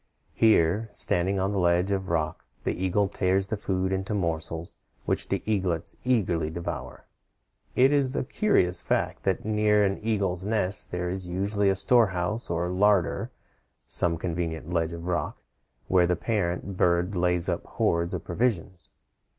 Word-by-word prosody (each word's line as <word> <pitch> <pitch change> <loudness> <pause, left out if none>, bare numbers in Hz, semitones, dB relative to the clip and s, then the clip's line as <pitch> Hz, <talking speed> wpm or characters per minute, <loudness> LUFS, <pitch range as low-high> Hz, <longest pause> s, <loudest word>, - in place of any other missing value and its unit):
Here, 110 0 +3
standing 95 +3 0
on 95 +1 0
the 100 - -1
ledge 90 +2 +2
of 95 -1 -2
rock, 80 -2 -1 0.2
the - - 0
eagle 100 +2 +2
tears 95 -1 +1
the 105 - -2
food 95 -2 -1
into 95 +2 -2
morsels, 80 -2 -3 0.3
which - - 0
the - - -1
eaglets 95 -6 0
eagerly 90 -11 +1
devour. 85 +2 -6 0.7
It 130 +3 +5
is 140 -2 +2
a - - 0
curious 110 - +1
fact - - -1
that - - 0
near 105 -1 +3
an 95 0 -1
eagle's 100 -5 -1
nest 105 -2 -1
there 90 0 -3
is 95 -1 -5
usually 100 +3 0
a 95 - +2
storehouse 100 -1 +2
or 85 +1 -1
larder 100 -1 +2 0.6
some 85 -1 +1
convenient 85 -1 -3
ledge 85 -1 0
of 85 0 -7
rock 85 -4 -2 0.5
where 90 -2 +4
the 90 - +2
parent 95 -2 -2
birds 90 +3 +2
lay 90 0 +2
up - - -1
hoards 85 +1 0
of - - -5
provisions. 95 -4 -2
95 Hz, 155 wpm, -27 LUFS, 85-105 Hz, 0.7 s, It